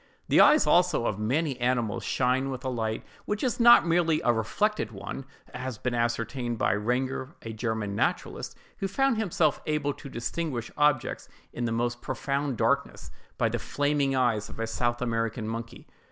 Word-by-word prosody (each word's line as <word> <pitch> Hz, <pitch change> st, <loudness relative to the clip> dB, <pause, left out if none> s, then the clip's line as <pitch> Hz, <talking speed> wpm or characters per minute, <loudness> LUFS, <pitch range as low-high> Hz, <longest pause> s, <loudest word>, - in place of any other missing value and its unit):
The -, -, +6 dB
eyes 305 Hz, -, +6 dB
also 175 Hz, -8 st, +3 dB
of 105 Hz, -, -1 dB
many 135 Hz, +5 st, 0 dB
animals 120 Hz, -4 st, 0 dB
shine 130 Hz, +1 st, +1 dB
with 130 Hz, 0 st, -5 dB
a -, -, 0 dB
light 110 Hz, -3 st, -2 dB, 0.2 s
which 210 Hz, 0 st, -2 dB
is 250 Hz, -2 st, 0 dB
not 235 Hz, -6 st, +8 dB
merely 165 Hz, -2 st, +2 dB
a 120 Hz, -, +4 dB
reflected 120 Hz, -, 0 dB
one—as 120 Hz, +7 st, -9 dB
has 130 Hz, -3 st, -4 dB
been 125 Hz, +1 st, -2 dB
ascertained 120 Hz, +1 st, -1 dB
by -, -, +2 dB
Rengger, 130 Hz, +6 st, -2 dB
a 115 Hz, -, -6 dB
German 110 Hz, -2 st, -2 dB
naturalist, -, -, -2 dB, 0.2 s
who 195 Hz, -, -1 dB
found 270 Hz, +4 st, +1 dB
himself 205 Hz, -6 st, +1 dB
able 150 Hz, -2 st, 0 dB
to 140 Hz, -, -11 dB
distinguish 125 Hz, 0 st, -3 dB
objects 150 Hz, -3 st, +1 dB, 0.2 s
in 120 Hz, -, -2 dB
the 115 Hz, -, -1 dB
most 120 Hz, +1 st, -1 dB
profound 140 Hz, -1 st, -2 dB
darkness, -, -, 0 dB, 0.3 s
by -, -, +2 dB
the -, -, -2 dB
flaming 145 Hz, -1 st, 0 dB
eyes 115 Hz, -5 st, +1 dB
of -, -, -11 dB
a 115 Hz, -, 0 dB
South 120 Hz, +2 st, -1 dB
American 115 Hz, -1 st, -1 dB
monkey. 115 Hz, +1 st, -6 dB
125 Hz, 170 wpm, -27 LUFS, 115-145 Hz, 0.3 s, not